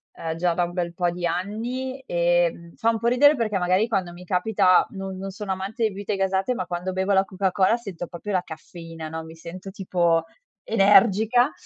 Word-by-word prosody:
uhm, 160 -1 -4
già 175 +1 +1
da 175 +1 +1
un 175 - -8
bel 175 -1 -2
po' 175 0 0
di 175 0 -4
anni 235 +9 -3
e, 175 0 +2
mhmm, 170 0 -14
fa 225 - +1
un 225 - -3
po' 235 - -1
ridere 285 +5 +5
perché, 220 -5 -1
magari, 185 +4 +2
quando 195 -6 -1
mi 180 +1 -12
capita 185 0 +3
no 195 -1 -6
non 190 +1 -6
sono 200 0 -4
amante 195 +5 -4
di 220 - +3
bibite 200 +1 -4
gasate, 195 +4 0
ma 185 -7 -4
quando 180 +1 -3
bevo 190 +1 0
la 190 - +4
Coca-Cola 190 +2 +1
sento 195 -7 -7
proprio 180 +4 -6
la 185 -1 +1
caffeina, 165 0 -9
no, 160 0 -5
mi 160 0 -11
sento, 180 +4 -9
tipo, 170 -4 +1 0.4
energica, 220 +4 +4
190 Hz, 205 wpm, -24 LUFS, 175-210 Hz, 0.4 s, ridere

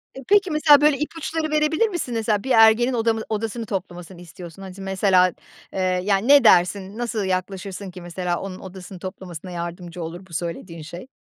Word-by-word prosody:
E, 270 - -9
peki, 400 -4 +4
mesela, 300 -1 +6
böyle, 300 -2 +4
ipuçları 315 0 -3
verebilir 305 +8 +2
misin? 345 -10 -4
Mesela 220 -2 0
bir 265 - -3
ergenin 225 +3 +5
odamı 225 -1 +1
odasını 225 +1 -3
toplamasını 180 -2 -6
istiyorsun, 175 +1 -11
hani, 190 -1 -8
s 195 - -11
mesela, 190 -2 +3 0.4
eee, - - -3 0.2
yani, 200 +3 +1
ne 285 -2 +7
dersin, 190 +1 +3
nasıl 235 -3 -2
yaklaşırsın 190 +1 -4
ki 180 0 -10
mesela, 175 0 -3
onun 190 -1 -7
odasını 185 -1 -10
toplamasına 185 -2 -8
yardımcı 175 0 -6
olur, 175 +3 -7
bu 170 - -17
söylediğin 165 0 -5
şey? 170 +8 -9
195 Hz, 175 wpm, -22 LUFS, 180-235 Hz, 0.4 s, ne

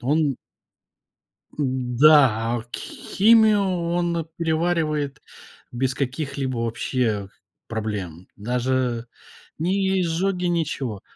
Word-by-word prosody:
он 145 +1 +1 1.2
Да, 135 +2 +5 0.3
а 115 - -4
кх 120 - -8
химию 220 0 +3
он 170 -3 -1
переваривает 160 -3 0 0.5
без 130 +1 -1
каких-либо 135 -1 -3
вообще 115 -3 -1 0.4
проблем. 100 -6 -4
Даже 125 +1 -1 0.5
ни 190 +3 +1
изжоги, 180 +2 0
ничего. 145 - -2
140 Hz, 80 wpm, -23 LUFS, 120-170 Hz, 1.2 s, Да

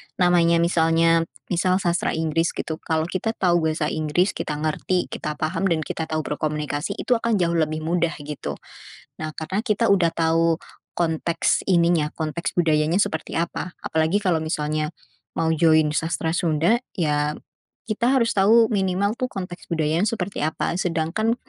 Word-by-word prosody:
namanya 175 -2 +4
misalnya, 165 0 +3 0.2
misal 180 +1 +2
Sastra 175 -1 0
Inggris 160 +1 0
gitu, 160 -1 -4
kalau 160 -1 -1
kita 205 +6 -2
tahu 175 -3 +2
bahasa 155 -1 -1
Inggris, 155 +5 +1
kita 150 - -4
ngerti, 155 +4 -1
kita 150 -1 -4
paham 165 +5 -1
dan 160 -3 0
kita 160 +1 -4
tahu 155 0 -2
berkomunikasi, 150 0 -3
itu 245 -2 0
akan 230 -1 +1
jauh 170 -3 +1
lebih 155 0 -1
mudah, 170 0 0
gitu. 150 0 -5 0.7
Nah, 155 - -3
karena 190 +8 -3
kita 230 -1 +1
udah 185 -5 +3
tahu 165 0 +2 0.3
konteks 165 0 0
ininya, 170 -3 +3
konteks 160 +1 -3
budayanya 160 +2 +2
seperti 160 -4 -1
apa, 170 +1 -3
apalagi 160 +5 +1
kalau 175 -6 0
misalnya, 155 0 -2 0.5
mau 160 0 +1
join 160 -1 +4
Sastra 165 0 -1
Sunda, 170 +6 +2 0.2
ya 150 -3 0 0.5
kita 235 +4 +1
harus 235 -3 +2
tahu 220 +3 +4
minimal 195 0 +1
tuh 255 - 0
konteks 180 -6 -7
budayanya 165 +3 +1
seperti 200 -3 -3
apa, 155 - -1
sedangkan 180 +7 0
165 Hz, 150 wpm, -23 LUFS, 155-185 Hz, 0.7 s, namanya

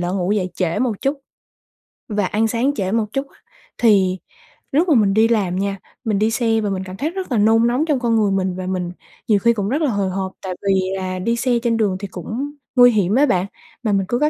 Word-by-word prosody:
lỡ 175 +1 -2
ngủ 185 +1 0
dậy 190 -3 -1
trễ 180 +1 -1
một 235 -5 -1
chút 275 +2 0 0.9
và 210 -3 -1
ăn 215 +4 +1
sáng 240 +5 0
trễ 190 -5 -2
một 225 0 +1
chút, 270 +1 -2 0.5
thì 195 -5 +3 0.5
lúc 315 +6 +2
mà 300 - +5
mình 205 -4 +3
đi 220 +2 +4
làm 205 -6 +1
nha, 195 +1 -1 0.3
mình 215 -4 0
đi 215 +2 +2
xe 225 -1 +1
và 210 - -1
mình 190 -1 -2
cảm 185 0 -8
thấy 300 - -1
rất 370 -2 -6
là 240 - +2
nôn 225 +2 +4
nóng 255 +6 +1
trong 295 -5 +1
con 235 -2 +1
người 210 -3 +2
mình 190 -1 0
và 185 0 -5
mình 180 -2 -2 0.4
nhiều 210 -3 +4
khi 235 +3 +3
còn 205 -2 -2
rất 285 +6 0
là 295 -5 +1
hồi 200 -3 0
hộp, 190 0 -3
tại 185 -1 -4
vì 195 -1 +3 0.2
là 185 -1 -3
đi 230 +6 0
xe 240 0 +1
trên 235 -2 +1
đường 205 -4 +1
thì 200 - -5
cũng 225 - -5 0.2
nguy 245 -1 +7
hiểm 205 -2 +1
á 280 +3 +5
bạn, 185 -9 +1 0.4
mà 220 - +1
mình 195 -1 +1
cứ 240 - 0
có 300 +1 +3
215 Hz, 250 wpm, -20 LUFS, 190-240 Hz, 0.9 s, nguy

